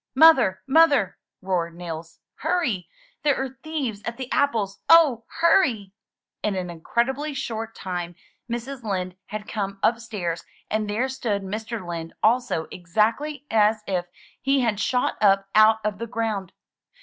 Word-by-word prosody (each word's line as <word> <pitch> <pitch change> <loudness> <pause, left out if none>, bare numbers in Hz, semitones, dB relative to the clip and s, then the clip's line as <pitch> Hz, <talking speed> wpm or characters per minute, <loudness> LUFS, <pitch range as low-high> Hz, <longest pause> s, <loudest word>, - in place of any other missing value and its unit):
''Mother, 265 -12 +7
Mother!" 285 - +4 0.2
roared 175 -3 -1
Nils. 165 -1 -7 0.2
"Hurry! 255 - -1 0.3
There 295 -3 +2
are 265 0 -4
thieves 275 -10 -3
at 235 - -5
the 260 -1 -6
apples! 220 -8 +1
Oh, 295 -9 +6 0.2
hurry 260 - +3 0.2
!' - - -67
' - - -66
In 210 -2 0
an 180 -2 -3
incredibly 265 - -1
short 225 -4 -4
time 175 -2 -4 0.3
Mrs. 240 +3 -4
Lind 185 -4 -3
had 215 0 -6
come 200 -2 -3
upstairs, 215 -8 -1 0.3
and 215 -1 0
there 225 +6 0
stood 235 -7 -2
Mr. 215 0 -5
Lind 165 -1 -5
also, 225 -8 +2
exactly 225 - 0
as 215 0 +3
if 180 -2 -1 0.3
he 275 0 +2
had 225 -4 0
shot 250 +3 0
up 195 -1 +4
out 215 +1 +7
of 210 -1 -1
the 230 - -4
ground. 220 -5 -2
220 Hz, 150 wpm, -24 LUFS, 190-260 Hz, 0.3 s, Mother